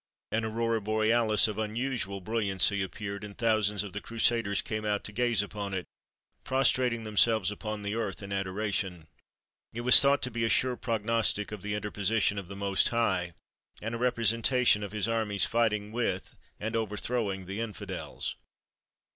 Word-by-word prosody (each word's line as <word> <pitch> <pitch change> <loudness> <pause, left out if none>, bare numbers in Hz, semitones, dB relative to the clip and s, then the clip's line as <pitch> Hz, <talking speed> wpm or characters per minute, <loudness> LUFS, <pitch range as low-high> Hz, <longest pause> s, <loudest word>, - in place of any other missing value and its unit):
An 115 +1 0
aurora 115 0 0
borealis 110 +1 +2
of 105 0 -4
unusual 110 -2 -2
brilliancy 100 -1 +1
appeared, 100 +1 -5
and 100 -1 -8
thousands 105 -3 +1
of 100 - -8
the 105 - -4
Crusaders 115 -3 +1
came 110 0 -3
out 105 -1 0
to - - -6
gaze 115 -2 +1
upon 100 -1 -5
it, 90 - -3 0.6
prostrating 125 -3 +2
themselves 110 -2 +3
upon 105 0 -5
the 100 +1 -2
earth 105 -4 -3
in 100 0 -5
adoration. 95 -3 -2 0.7
It 120 - -4
was 125 +1 +9
thought 140 0 +3
to 125 - -2
be 115 0 -2
a 115 - +2
sure 125 +1 +2
prognostic 115 -3 0
of 105 -3 -6
the 105 +1 -3
interposition 105 0 0
of 95 - -8
the 100 - -8
Most 100 -1 +1
High; 95 -7 0 0.4
and 110 +2 -4
a 115 - -3
representation 120 -1 +3
of 105 - -5
his 105 0 0
armies 110 -3 +1
fighting 105 -3 0
with 110 -5 -2 0.2
and 110 +2 -3
overthrowing 105 -2 -1
the 95 +4 -5
infidels. 115 -3 -5
110 Hz, 165 wpm, -29 LUFS, 100-115 Hz, 0.7 s, was